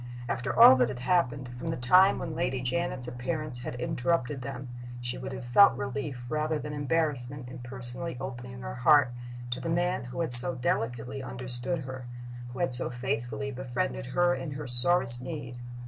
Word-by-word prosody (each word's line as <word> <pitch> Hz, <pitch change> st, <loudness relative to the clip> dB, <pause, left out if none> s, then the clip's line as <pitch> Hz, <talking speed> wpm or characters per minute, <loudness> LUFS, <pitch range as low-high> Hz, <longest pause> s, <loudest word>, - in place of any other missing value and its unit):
After 120 Hz, +1 st, -3 dB
all 130 Hz, -, +10 dB
that 125 Hz, -2 st, +2 dB
had 125 Hz, -2 st, -6 dB
happened, 135 Hz, -5 st, 0 dB
from 165 Hz, -, -5 dB
the 160 Hz, -, -2 dB
time 180 Hz, +11 st, +5 dB
when 160 Hz, -, -5 dB
Lady 155 Hz, -5 st, -2 dB
Janet's 130 Hz, 0 st, -3 dB
appearance 125 Hz, +2 st, -2 dB
had 125 Hz, -, -6 dB
interrupted 130 Hz, +2 st, -1 dB
them, 135 Hz, 0 st, -7 dB, 0.3 s
she 120 Hz, 0 st, -4 dB
would -, -, -6 dB
have 130 Hz, -1 st, -7 dB
felt 120 Hz, +2 st, +5 dB
relief 130 Hz, -1 st, -5 dB
rather 155 Hz, +3 st, -1 dB
than 150 Hz, 0 st, -6 dB
embarrassment 145 Hz, -3 st, -2 dB
in 125 Hz, -, -9 dB
personally 125 Hz, +4 st, -5 dB
opening 125 Hz, -1 st, -7 dB
her -, -, -6 dB
heart 130 Hz, +1 st, +4 dB, 0.4 s
to 120 Hz, -, -2 dB
the 165 Hz, -, -5 dB
man 175 Hz, -5 st, -1 dB
who 125 Hz, +7 st, -5 dB
had 160 Hz, -7 st, -2 dB
so 125 Hz, +1 st, +7 dB
delicately 125 Hz, +1 st, -2 dB
understood 125 Hz, +5 st, -1 dB
her, 130 Hz, -1 st, -8 dB, 0.4 s
who 120 Hz, +1 st, -10 dB
had 175 Hz, -7 st, 0 dB
so 125 Hz, -, +4 dB
faithfully 125 Hz, 0 st, -4 dB
befriended 120 Hz, -, -4 dB
her 175 Hz, 0 st, +2 dB
in 150 Hz, -4 st, -5 dB
her 145 Hz, +1 st, -6 dB
sorest 125 Hz, 0 st, +6 dB
need. 130 Hz, -3 st, -7 dB
130 Hz, 180 wpm, -28 LUFS, 125-150 Hz, 0.4 s, all